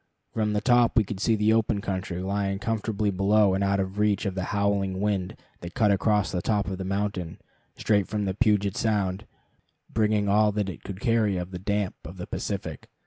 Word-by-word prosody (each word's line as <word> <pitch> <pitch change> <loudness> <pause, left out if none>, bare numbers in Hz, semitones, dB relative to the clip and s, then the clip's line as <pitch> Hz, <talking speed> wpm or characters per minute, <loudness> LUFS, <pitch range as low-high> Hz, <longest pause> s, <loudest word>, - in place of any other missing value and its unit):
From 105 -1 0
the 105 - 0
top 120 -1 +3
we 110 - +6
could 105 -1 -6
see 115 +2 +2
the 105 +1 +3
open 110 -2 +1
country 95 -2 -3
lying 100 0 -1
comfortably 110 -2 -1
below 100 +1 +3
and 95 +1 0
out 100 0 +1
of 95 +1 -3
reach 105 0 +2
of 100 - -1
the 95 -1 -3
howling 100 -2 0
wind 100 -3 -1 0.2
that 85 0 -9
cut 105 -3 +3
across 100 -1 +2
the 90 - -1
top 105 +2 0
of 95 -1 -4
the - - -3
mountain, 95 -3 -2 0.4
straight 100 -3 +2
from 105 -1 -2
Puget 105 -4 +2
Sound, 105 -2 -1 0.6
bringing 105 -2 +1
all 105 +1 +4
that 105 -2 -1
it 85 - -8
could 100 -1 -7
carry 115 -5 +2
of 90 +1 -5
the 90 - -6
damp 100 0 -1
of 85 +4 -9
the 90 - -5
Pacific. - - -5
100 Hz, 200 wpm, -26 LUFS, 95-105 Hz, 0.6 s, we